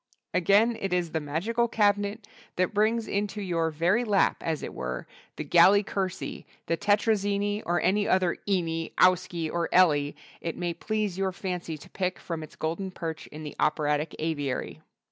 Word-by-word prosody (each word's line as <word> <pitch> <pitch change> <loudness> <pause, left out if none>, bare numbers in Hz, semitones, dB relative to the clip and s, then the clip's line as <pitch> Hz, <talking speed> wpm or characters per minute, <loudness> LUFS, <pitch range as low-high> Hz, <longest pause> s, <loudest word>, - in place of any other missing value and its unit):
_" - - -58 0.3
Again 200 +6 +4
it 195 -2 -1
is 175 -2 0
the 160 - 0
magical 190 +11 0
cabinet 205 -1 +1 0.3
that 185 +3 0
brings 220 +2 +2
into 205 +1 -2
your 170 -4 0
very 175 +9 +2
lap 205 -4 +2
as 160 -2 -2
it - - -5
were 65 0 -4 0.3
the - - -4
Galli 175 +7 +6
Curci, 190 -2 -4 0.2
the 165 - +1
Tetrazzini 205 +1 +1
or 175 +1 +2
any 205 +3 +2
other 185 -2 +2
"ini," 165 -4 -1
"owski" 180 -3 +2
or 170 -1 0
"elli" 150 -5 +4 0.3
it 165 - -4
may 175 -1 -2
please 210 +1 -2
your 190 -1 +1
fancy 180 -3 -4
to 145 - -14
pick 185 -1 -2
from 165 -2 -5
its 155 - -10
golden 170 +5 -3
perch 165 -3 -6
in 155 +1 -9
the 150 - -7
operatic 150 0 +1
aviary. 140 - -3
180 Hz, 170 wpm, -27 LUFS, 160-205 Hz, 0.3 s, Galli